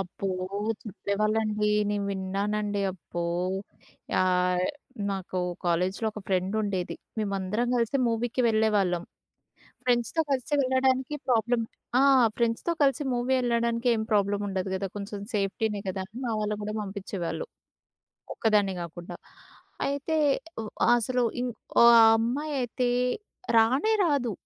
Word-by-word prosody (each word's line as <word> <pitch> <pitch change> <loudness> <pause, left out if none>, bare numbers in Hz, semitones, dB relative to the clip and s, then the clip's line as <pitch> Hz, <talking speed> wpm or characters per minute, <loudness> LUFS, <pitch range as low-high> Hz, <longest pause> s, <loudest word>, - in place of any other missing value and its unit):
అబ్బో! 195 +1 -5 0.6
చెప్పేవాళ్ళండి. 215 +1 0 0.2
నేను 205 -1 -1
విన్నానండి. 200 +2 -1
అబ్బో! 175 -1 -5 0.9
యాహ్! 180 0 +2 0.5
నాకు 190 -1 -3 0.3
కాలేజ్‌లో 180 +5 0
ఒక 210 - -7
ఫ్రెండ్ 190 +1 0
ఉండేది. 190 -3 -2 0.2
మేమందరం 200 +2 -1
కలిసే 235 +3 +1
మూవీకి 230 +2 -1
వెళ్ళేవాళ్ళం. 210 -5 +2 0.8
ఫ్రెండ్స్‌తో 245 +6 +2
కలిసి 265 +1 -1
వెళ్ళడానికి 260 +1 +1
ప్రాబ్లమ్ 235 0 +2 0.4
ఆ! - - +5 0.4
ఫ్రెండ్స్‌తో 235 +7 0
కలిసి 280 +2 +2
మూవీ 245 +2 0
ఎళ్ళడానికి 235 0 0
ఏం 220 - -1
ప్రాబ్లమ్ 205 0 +2
ఉండదు 190 0 -2
కదా! 195 +1 -2
కొంచెం 205 0 -5 0.2
సేఫ్టీనే 205 +1 -1
కదా! 190 0 -3 0.2
మా 240 - -1
వాళ్ళు 210 0 -1
కూడా 210 +1 -3
పంపించేవాళ్ళు. 195 - -4 0.9
ఒక్కదాన్నే 210 -3 +2
కాకుండా. 170 +1 -7 0.7
అయితే 285 +3 -1 0.5
వ - - -5 0.3
అసలు 250 +1 0 0.2
ఇన్ 250 0 -1 0.3
ఓ - - +9 0.3
అమ్మాయయితే 250 +1 -1 0.7
రానే 260 - +4
రాదు. 285 -8 +1
215 Hz, 110 wpm, -27 LUFS, 195-240 Hz, 0.9 s, ఓ